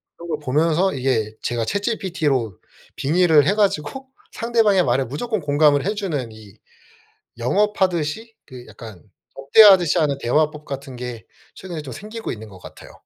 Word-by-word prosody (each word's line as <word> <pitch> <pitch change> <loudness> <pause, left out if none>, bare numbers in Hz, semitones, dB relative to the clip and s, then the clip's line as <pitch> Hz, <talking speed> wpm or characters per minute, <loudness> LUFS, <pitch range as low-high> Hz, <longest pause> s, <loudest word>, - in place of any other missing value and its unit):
그런 170 0 -11
걸 155 -2 -2
보면서 160 +7 +1
이게 120 -5 -1
제가 120 -1 -2
ChatGPT로 165 - -2 0.4
빙의를 155 0 +3
해 - - +3
가지고 210 - -1 0.3
상대방의 225 -5 +2
말에 125 +1 +1
무조건 215 - -3
공감을 145 0 +2
해 205 - 0
주는 150 - -3
이 110 -3 -15 0.8
영업하듯이 190 - -1
그 125 -3 -12
약간 110 -7 -12 0.3
접대하듯이 180 +4 +6
하는 145 -3 0
대화법 150 +4 0
같은 135 -2 -7
게 120 -4 -7 0.3
최근에 175 -5 -7
좀 135 -3 -9
생기고 215 - -7
있는 110 -1 -9
것 95 -2 -14
같아요. - - -13
150 Hz, 345 characters per minute, -21 LUFS, 125-190 Hz, 0.8 s, 접대하듯이